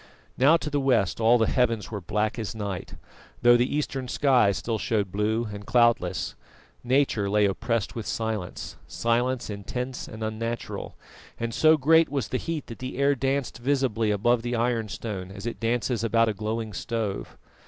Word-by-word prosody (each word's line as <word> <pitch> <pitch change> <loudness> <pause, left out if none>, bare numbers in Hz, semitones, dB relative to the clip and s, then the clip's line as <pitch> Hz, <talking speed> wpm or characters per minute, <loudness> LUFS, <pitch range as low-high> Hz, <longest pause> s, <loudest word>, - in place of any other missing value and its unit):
Now 145 +6 +5
to 150 - -5
the 145 - +1
west 115 -8 +1
all 115 +2 +6
the 115 - +3
heavens 115 -3 +1
were 105 -2 -4
black 105 +6 -1
as 115 0 -4
night, 100 -4 -5 0.5
though 120 0 +8
the 120 +3 +1
eastern 135 -3 -2
sky 125 -6 +3
still 110 +3 -2
showed 100 -4 0
blue 110 +3 0
and 100 0 -7
cloudless. 115 -7 +2 0.5
Nature 125 -5 +2
lay 105 +1 +3
oppressed 115 +2 -1
with 115 -3 -5
silence 105 -3 -4
silence 120 +2 0
intense 125 +5 -5
and 110 0 -7
unnatural; 115 +2 -4 0.4
and 115 0 -2
so 155 +4 +5
great 160 +3 +5
was 135 -6 -2
the 130 - 0
heat 165 -4 -4
that 115 - -9
the 130 0 -5
air 140 +1 +3
danced 135 -1 -1
visibly 125 -4 +1
above 115 +4 +2
the 120 +1 -2
ironstone 115 -5 -2
as 100 +2 -9
it 120 - -4
dances 115 0 0
about 115 0 +3
a - - 0
glowing 110 +1 -3
stove. 110 -1 -3
115 Hz, 170 wpm, -26 LUFS, 105-125 Hz, 0.5 s, though